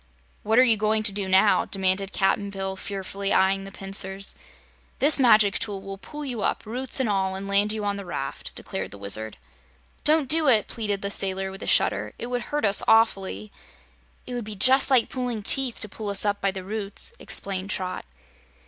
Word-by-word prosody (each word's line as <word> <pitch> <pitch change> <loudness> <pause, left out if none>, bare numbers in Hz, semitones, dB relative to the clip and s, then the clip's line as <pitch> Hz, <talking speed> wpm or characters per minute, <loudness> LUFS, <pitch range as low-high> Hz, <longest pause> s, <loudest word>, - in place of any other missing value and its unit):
"What 220 +2 0
are 255 - +8
you 230 -4 +3
going 215 +1 0
to 210 - +3
do 195 -1 -3
now?" 190 +2 +4
demanded 190 0 -1
Cap'n 200 +1 0
Bill, 190 -1 -4
fearfully 195 0 -4
eyeing 195 0 +2
the 195 - -9
pincers. 195 0 -1 0.6
"This 290 +1 +5
magic 215 -6 +4
tool 205 -3 -3
will 195 0 -9
pull 300 +7 -7
you 245 -5 -4
up, - - -2
roots 250 +5 0
and 260 - +1
all, 190 -2 -1
and 195 +1 -6
land 200 +1 +2
you 215 -1 -4
on 200 0 -1
this 200 - -7
raft," 135 -5 -5
declared - - -6
the 100 - -11
Wizard. 105 +2 -4 0.7
"Don't 305 -2 +2
do 315 +2 +3
it!" 220 -6 +4
pleaded 205 -3 -3
the 200 - -2
sailor, 190 -1 -1
with 195 - -10
a - - -6
shudder. - - +1
"It 240 +2 -6
would 245 0 -1
hurt 295 +2 -2
us 200 0 +4
awfully." 195 - +2 0.7
"It 250 - -7
would 245 -1 -3
be 215 -1 -6
just 260 +7 +6
like 255 -4 +4
pulling 245 -4 -4
teeth 265 +1 +2
to 210 - -2
pull 210 +1 -6
us 200 +1 +1
up 205 -1 -1
by 195 - +1
the 190 -1 -6
roots," 205 - -5
explained 195 0 -3
Trot. 185 -3 -4
200 Hz, 200 wpm, -24 LUFS, 195-230 Hz, 0.7 s, are